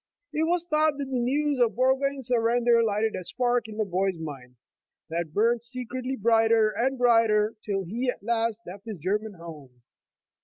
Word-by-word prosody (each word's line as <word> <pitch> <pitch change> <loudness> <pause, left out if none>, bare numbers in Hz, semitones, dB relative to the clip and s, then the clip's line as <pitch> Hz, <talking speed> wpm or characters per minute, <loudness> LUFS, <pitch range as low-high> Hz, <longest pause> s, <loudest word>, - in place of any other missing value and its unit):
It 315 +1 +1
was 345 0 +1
thought 305 -2 +2
that 275 -2 -4
the 255 - 0
news 280 +3 0
of 235 -2 +2
Burgoyne's 265 +2 +1
surrender 235 0 +3
lighted 220 0 0
a 185 - -5
spark 245 +3 0
in 215 -1 -9
the 215 - 0
boy's 190 -1 -1
mind, 135 -6 -8 0.6
that 165 -1 -3
burned 230 +6 +1
secretly 255 +1 -5
brighter 225 -1 +3
and 260 +4 -1
brighter, 225 -3 +3
till 195 -2 -2
he 235 +8 -2
at 245 - -4
last 230 0 -1
left 195 +4 -10
his 215 -3 -5
German 205 +6 -2
home. 150 -8 -12
230 Hz, 175 wpm, -26 LUFS, 200-255 Hz, 0.6 s, surrender